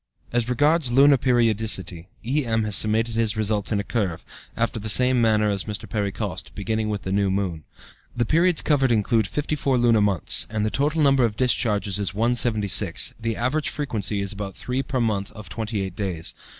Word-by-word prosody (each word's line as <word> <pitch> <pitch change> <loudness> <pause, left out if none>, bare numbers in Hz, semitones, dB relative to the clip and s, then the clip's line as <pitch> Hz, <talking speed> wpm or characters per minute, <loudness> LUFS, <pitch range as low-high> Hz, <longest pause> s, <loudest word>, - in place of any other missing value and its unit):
As 120 0 0
regards 145 +2 +2
lunar 140 +3 +6
periodicity, 110 -8 0 0.2
E.M., 120 -4 0
has 105 -2 0
summated 110 +2 +1
his 110 -2 0
results 105 -1 -1
in 105 - +1
a - - -2
curve, 100 -7 -3 0.3
after 115 0 -1
the 110 +1 -5
same 125 +2 +5
manner 110 -2 +2
as 100 -2 0
Mr. 105 -2 -5
Perry 105 -3 -2
Coste, - - -5
beginning 110 +2 -2
with 105 -1 -3
the 95 - -4
new 100 0 +1
moon. 95 -5 -3 0.5
The 120 - +1
periods 170 +6 +2
covered 135 -4 +2
include 110 -1 +1
54 145 -1 -1
lunar 120 -3 +3
months, 100 -6 +2
and 110 -1 -2
the 110 - -1
total 150 +3 0
number 135 -2 +4
of 110 -3 0
discharges 105 -6 +1
is 100 -1 -3
176; 115 -3 +1
the 115 0 -3
average 140 +5 -1
frequency 105 -8 -3
is 100 +1 -1
about 100 -2 -6
3 125 +1 -3
per 135 -1 -3
month 105 -4 -1
of 105 -6 -11
twenty 105 +2 -3
eight 95 -2 -5
days. 90 -5 -4
110 Hz, 190 wpm, -23 LUFS, 100-125 Hz, 0.5 s, lunar